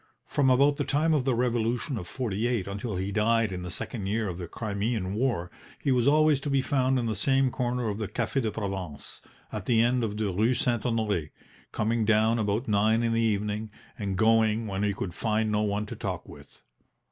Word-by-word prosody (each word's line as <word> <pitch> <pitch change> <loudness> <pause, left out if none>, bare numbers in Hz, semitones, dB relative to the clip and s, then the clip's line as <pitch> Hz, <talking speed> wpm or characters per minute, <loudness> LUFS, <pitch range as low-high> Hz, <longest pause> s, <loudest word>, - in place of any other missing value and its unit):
From 140 -2 +2
about 140 +3 +4
the - - 0
time 155 +3 +2
of 140 -4 +1
the 130 -3 +2
Revolution 120 +3 0
of 90 -6 -5
'48 115 -1 -1
until 100 +2 -4
he 95 +2 -2
died 110 +1 +2
in 90 -1 -4
the 90 - -5
second 100 +2 -5
year 110 +2 0
of 90 -1 -5
the 85 - -5
Crimean 100 0 -2
War 105 -7 -1 0.3
he 140 - 0
was 125 0 +2
always 155 -1 +4
to 145 - -4
be 140 -1 +2
found 130 0 +1
in 120 - 0
the 110 - 0
same 135 +5 +2
corner 125 -1 -1
of 105 0 -3
the 110 - -2
Cafe 135 - -1
de 110 - 0
Provence, 95 -8 -5 0.3
at 105 -3 -5
the 115 -3 +3
end 120 +1 +3
of 105 -2 -2
the 105 -3 -1
Rue 110 +7 +2
St. 120 -4 0
Honore, 105 -9 0 0.4
coming 115 +1 0
down 110 +2 +3
about 105 +3 -1
nine 110 +2 +3
in 115 -1 +1
the 115 - +2
evening, 105 0 -1 0.3
and 100 -5 -3
going 110 0 +3
when 100 -2 -3
he 105 0 +2
could 90 -2 -4
find 110 +1 0
no 105 0 +1
one 105 0 -1
to - - -7
talk - - -4
with. - - -14
110 Hz, 215 wpm, -27 LUFS, 100-125 Hz, 0.4 s, about